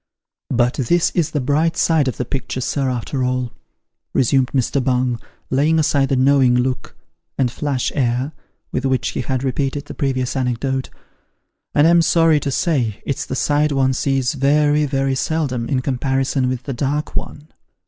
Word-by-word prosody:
" - - -71
But 125 -1 +2
this 165 +7 +2
is 170 -4 0
the 150 - -2
bright 150 +5 +1
side 160 -4 +2
of 130 - -2
the 125 - -2
picture, 130 +1 -4
sir, 135 +1 -1
after 125 +2 -2
all," 125 -1 -1 0.6
resumed 130 0 +3
Mr. 130 0 0
Bung, 125 -2 0 0.3
laying 150 +5 +3
aside 140 -3 +2
the 135 - +2
knowing 130 -1 +4
look, 125 +1 -1 0.4
and 130 -3 +1
flash 140 -2 -2
air, 130 +1 0 0.4
with 130 - -2
which 130 -1 0
he - - -3
had 130 +1 -2
repeated 135 +1 -2
the - - -8
previous 130 -3 -1
anecdote 130 +1 -1 0.4
" - - -38
and 145 - +5
I'm 170 +1 +5
sorry 165 -2 +4
to 140 - -3
say, 130 - -1
it's 140 - -3
the - - -3
side 150 +2 +1
one 135 -1 +2
sees 135 -1 0
very, 145 +1 +2
very 135 -1 0
seldom, 130 -4 -1
in 135 -3 +1
comparison 135 0 0
with 130 -1 -3
the 140 - -4
dark 145 +4 -2
one. 150 +2 -5
135 Hz, 175 wpm, -19 LUFS, 125-145 Hz, 0.6 s, and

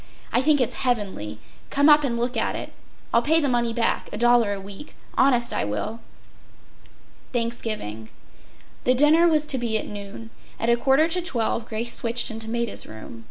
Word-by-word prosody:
I 245 - +3
think 295 +1 +3
it’s 250 - 0
heavenly. 200 - -2 0.3
Come 285 +1 +3
up 300 -1 +6
and 240 -4 -1
look 240 +2 -2
at 225 - -1
it. - - -7 0.4
I’ll 235 - +4
pay 320 +5 +3
the 290 - 0
money 240 -2 0
back, 230 0 -1
a - - -5
dollar 240 -2 +3
a 200 - -3
week—honest 240 +4 -1
I - - -1
will.” 105 - -4 1.3
Thanksgiving. 215 - -3 0.7
The 255 - +3
dinner 305 +5 +6
was 305 -2 +2
to 270 -4 +1
be 230 -2 0
at - - -3
noon. 205 +2 -9 0.3
At 230 +1 +1
a - - +5
quarter 270 +6 +3
to 360 +2 -1
twelve 235 -8 -2
Grace 230 +2 -2
switched 235 0 +2
into 225 0 -6
Maida’s 235 -1 -2
room. 110 +1 -10
235 Hz, 175 wpm, -24 LUFS, 220-265 Hz, 1.3 s, up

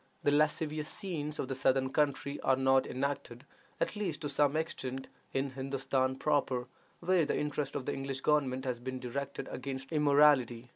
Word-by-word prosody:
The 145 - +4
lascivious 150 +1 +1
scenes 150 -6 -4
of - - -2
the 135 - -2
southern 130 0 +2
country 140 -1 0
are 130 - +3
not 130 0 +3
enacted, 130 -1 -3 0.3
at - - 0
least 185 -8 -3
to 150 - -2
the - - -5
same 145 +1 +3
extent, 135 -4 -3 0.2
in 135 0 -1
Hindostan 130 0 -1
proper, 135 -5 +1 0.4
where 180 0 +3
the 150 - 0
interest 150 -1 -2
of 140 -3 -3
the - - -1
English 135 0 -4
government 135 -3 +1
has 125 -2 -2
been 130 +1 -4
directed 140 +2 -4
against 135 +1 -5
immorality. 145 -5 +4
140 Hz, 175 wpm, -32 LUFS, 130-150 Hz, 0.4 s, The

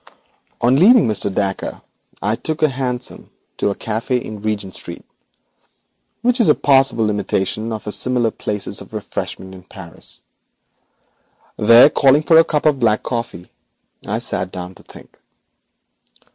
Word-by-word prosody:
On 125 +3 +3
leaving 225 - +6
Mr. 105 -2 -1
Dacre 95 0 -3 0.4
I 105 +2 +1
took 155 +6 -3
a 155 - +5
hansom 125 -2 -3 0.3
to - - 0
a 100 - -2
café 115 +3 -2
in 110 -3 -8
Regent 100 -3 -3
Street, 85 - -8 1.2
which 245 +1 +2
is 225 - +4
a - - +6
passable 135 -6 +3
imitation 105 +2 -2
of 110 -1 -5
similar 125 -3 +1
places 105 -1 -4
of - - -12
refreshment 95 0 -6
in 95 - -12
Paris. 90 -2 -11 1.3
There, 115 +5 +7
calling 140 +2 +4
for 160 +2 +6
a - - +7
cup 150 -2 -2
of 150 -3 +3
black 110 -3 +1
coffee, 115 -7 -5 0.5
I 105 - -3
sat 95 -6 -2
down 90 0 -7
to - - -18
think. - - -17
115 Hz, 145 wpm, -18 LUFS, 100-135 Hz, 1.3 s, There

